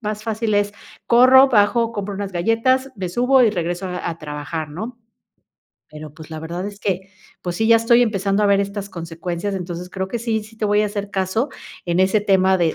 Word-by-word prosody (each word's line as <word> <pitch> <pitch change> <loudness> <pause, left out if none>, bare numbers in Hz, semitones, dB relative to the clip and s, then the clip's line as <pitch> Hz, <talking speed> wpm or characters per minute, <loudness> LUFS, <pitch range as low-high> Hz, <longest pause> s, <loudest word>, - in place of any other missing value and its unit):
más 215 -1 -4
fácil 220 -1 -1
es 205 0 +1 0.3
corro, 255 +3 +7
bajo, 230 +1 +3
compro 205 -1 -4
unas 195 0 -5
galletas, 230 +8 +1
me 185 -3 -4
subo 250 +6 +3
y 225 - +4
regreso 175 -1 -3
a 180 -1 -4
a 165 - -4
trabajar, 150 +1 -5
¿no? 220 +10 -7 1.0
Pero 150 -1 -9
pues, 160 0 -12
la 155 -1 -6
verdad 170 +4 -5
es 205 -1 -9
que, 190 -1 -2 0.3
pues 175 -1 -3
sí, 220 - +1
ya 230 - +7
estoy 230 +1 +4
empezando 200 -3 +1
a - - +4
ver 200 0 +4
estas 200 0 -4
consecuencias, 170 +2 -5
entonces 180 -1 -6
creo 190 0 -4
que 235 - -3
sí 225 -2 -1
sí 220 +1 -15
te 220 - -3
voy 210 0 +3
a 215 - +2
hacer 205 -1 -5
caso 195 +8 -1 0.3
en 175 +1 0
ese 195 +3 +3
tema 190 -2 +3
de 170 -3 +1
200 Hz, 210 wpm, -20 LUFS, 175-220 Hz, 1.0 s, corro